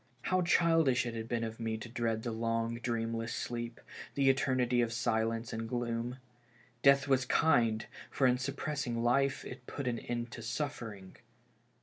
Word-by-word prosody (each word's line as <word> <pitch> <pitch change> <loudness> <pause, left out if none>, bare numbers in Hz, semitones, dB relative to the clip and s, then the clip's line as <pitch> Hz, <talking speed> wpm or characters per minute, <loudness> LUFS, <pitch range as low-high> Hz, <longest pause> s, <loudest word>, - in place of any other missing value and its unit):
How 185 0 +2
childish 165 -7 +4
it 120 - -3
had 115 -1 -4
been 115 -1 -1
of 115 0 -5
me 110 -1 -2
to 110 - -7
dread 115 -2 -1
the 120 - -2
long, 115 +1 -1
dreamless 115 -1 -2
sleep, 120 -1 -4 0.4
the 135 -1 +5
eternity 130 -2 +2
of 115 -1 0
silence 115 -1 0
and 115 0 -4
gloom. 120 0 -2 0.6
Death 140 0 +5
was 135 -2 +3
kind, 120 -6 +3 0.2
for 135 - +1
in 125 0 +4
suppressing 135 -3 -2
life 135 +3 +2
it - - -9
put 140 -3 -4
an 120 -2 0
end 120 -1 -4
to 115 - -7
suffering. 115 -6 -5
120 Hz, 160 wpm, -33 LUFS, 115-130 Hz, 0.6 s, the